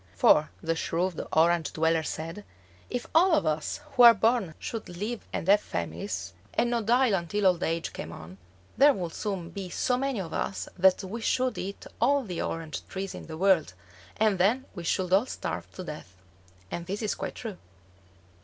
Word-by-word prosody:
For, 150 - +5
the 165 0 0
shrewd 170 +2 -1
Orange 165 +1 +3
dweller 160 0 +2
said, 165 +5 -5 0.5
if 245 - -3
all 350 +2 +5
of 305 - +3
us 155 - -1
who 250 - +2
are 235 -1 +10
born 220 -6 +1
should 225 -2 -6
live 210 +7 -5
and - - -3
have 205 +2 +6
families, 85 +2 -4 0.2
and 240 +1 +2
not 230 -3 -1
die 250 +2 +4
until 195 +3 -1
old 180 -2 +4
age 165 -1 -1
came 80 - -6
on, 85 +3 -11 0.4
there 285 +2 +6
would 175 -6 -4
soon 190 -5 -4
be 195 -2 -6
so 250 +7 0
many 270 -3 -1
of 165 -4 -5
us - - -2
that 190 +1 +4
we 215 +5 -5
should 255 +3 0
eat 195 +2 -6 0.2
all 275 +3 +3
the 180 -7 -4
orange 165 -2 -4
trees 195 0 -5
in - - -9
the 160 -1 -7
world, 180 - +3 0.4
and 210 -3 +2
then 230 +9 +3
we 175 - -7
should 185 +2 0
all 205 +7 +4
starve - - -5
to 185 - -7
death. 150 - -9 0.6
And 170 0 -5
this 200 +4 -3
is 210 - 0
quite - - -5
true. 215 -6 -6
185 Hz, 190 wpm, -28 LUFS, 165-225 Hz, 0.6 s, are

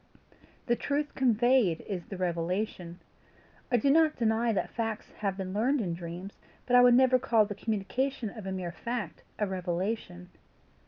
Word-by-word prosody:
The 240 - +2
truth 285 +3 -2
conveyed 240 -7 +3
is 185 -5 -6
the 195 - -7
revelation. 175 0 -2 0.7
I 245 - +4
do 275 +5 +3
not 315 0 +4
deny 230 0 +1
that 205 - -1
facts 225 -2 -4
have 195 -2 -1
been 190 -1 -4
learned 250 +8 +2
in 180 -7 -2
dreams, 175 +3 -8 0.3
but 250 - +2
I 245 - +9
would 245 -1 +7
never 255 0 +5
call 225 -3 +3
the 205 - -5
communication 225 +3 -2
of 210 -3 -9
a - - -3
mere 185 -2 -4
fact 235 -2 -5 0.2
a 210 - +1
revelation. 180 0 -3
215 Hz, 165 wpm, -29 LUFS, 185-245 Hz, 0.7 s, I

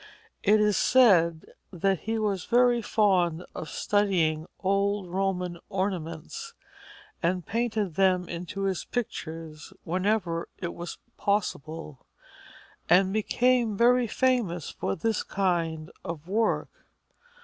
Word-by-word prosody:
It 210 +1 +4
is 210 -1 +3
said 170 -11 +4 0.2
that 190 0 0
he 225 +1 -2
was 205 -4 -1
very 245 0 +4
fond 180 -6 +2
of 160 - -6
studying 175 -6 +1 0.2
old 200 +1 +1
Roman 180 -1 -2
ornaments 190 - -4 0.7
and 180 0 0
painted 220 -5 -1
them 185 0 +2
into 180 +4 -5
his 190 -2 -1
pictures 165 -8 -5
whenever 180 -1 0
it 175 - -4
was 175 0 -7 0.2
possible, 165 -7 -2 0.8
and 185 +3 +5
became 235 0 +2
very 245 +1 +4
famous 225 - 0
for 95 - -3
this 220 +6 0
kind 170 -4 -1
of 165 -1 -6
work. 220 +4 +1
190 Hz, 110 wpm, -27 LUFS, 170-215 Hz, 0.8 s, and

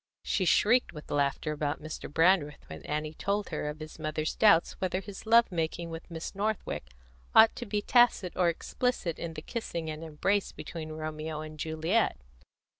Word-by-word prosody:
She 190 - 0
shrieked 235 +7 +4
with 150 -2 -10
laughter 145 +2 0
about 150 0 -2
Mr. 155 -1 -7
Brandreth 165 -2 +2
when 80 0 -8
Annie 150 +1 -2
told 200 +5 -1
her 150 -2 -2
of 150 +1 -7
his 155 +1 -9
mother's 155 0 -2
doubt 205 -6 +5
whether 185 0 0
his 195 +2 -9
love 230 -1 +6
making 165 0 -2
with 165 +2 -8
Miss 165 -1 -6
Northwick 205 - -2 0.5
ought 220 0 +8
to 240 - -5
be 205 0 -1
tacit 240 -7 +4
or 180 -2 +3
explicit 175 0 -2
in 165 -1 -5
the 155 - -7
kissing 170 -9 -4
and 155 +1 -7
embracing 190 +6 0
between 160 -2 -7
Romeo 155 0 -4
and 155 0 -9
Juliet. 160 +8 +1
165 Hz, 175 wpm, -30 LUFS, 155-200 Hz, 0.5 s, ought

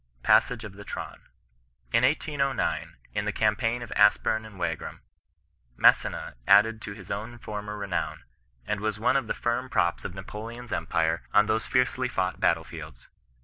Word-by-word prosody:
PASSAGE 125 -2 +4
OF 105 -3 -8
THE 100 +1 -10
TEAITN. - - -7 0.7
"In 115 +1 +4
1809, 140 -1 0 0.2
in - - -1
the - - 0
campaign 115 +3 +1
of 115 - -10
Aspem 105 +1 +3
and 105 -3 -14
Wagram: 90 - -4 0.7
Massena - - +3
added 110 +3 +5
to 100 - -6
his 100 -2 -10 0.3
former 105 0 -5
renown, 100 -3 -3 0.4
and 105 - -1
was 105 0 -2
one 115 - +2
of 135 -4 +1
the - - -1
firm 120 +2 -1
props 85 -7 +1
of 90 - -6
Napoleon's 115 +5 -7
empire 80 0 0
on 105 - +7
those 110 +1 0
fiercely 125 0 +1
fought 95 -7 -1
battle - - +2
fields. - - -10
110 Hz, 155 wpm, -27 LUFS, 100-120 Hz, 0.7 s, on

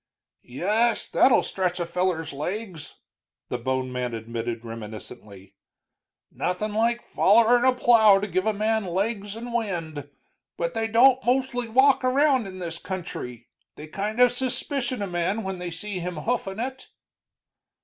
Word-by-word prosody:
"Yes, 210 - 0
that'll 255 - +4
stretch 185 -2 -2
a 175 - -1
feller's 170 -3 -1
legs," 175 +3 -5 0.5
the 125 - -3
bone 130 +1 -2
man 125 -2 -3
admitted, 115 +1 -5
reminiscently. 105 -3 -10 0.8
"Nothing 205 +4 -2
like 235 +2 0
follerin' 235 +4 +4
a 260 -1 +4
plow 220 -5 +6
to 205 - -2
give 185 0 -1
a - - +4
man 215 +1 0
legs 200 +3 -2
and 235 +1 -7
wind. 165 - -3 0.5
But 170 0 -2
they 225 0 -1
don't 250 +4 +5
mostly 245 -1 0
walk 265 +4 +4
around 260 -2 +3
in 185 -1 -9
this 170 -2 -5
country; 160 - -7 0.3
they 150 - -9
kind 205 +8 -4
of 250 -1 +6
suspicion 255 -1 -2
a - - -3
man 180 +5 -1
when 190 -1 -4
they 180 0 -4
see 185 +3 -5
him 180 0 -4
hoofin' 220 -4 -2
it." 260 +2 -5
195 Hz, 150 wpm, -25 LUFS, 165-235 Hz, 0.8 s, plow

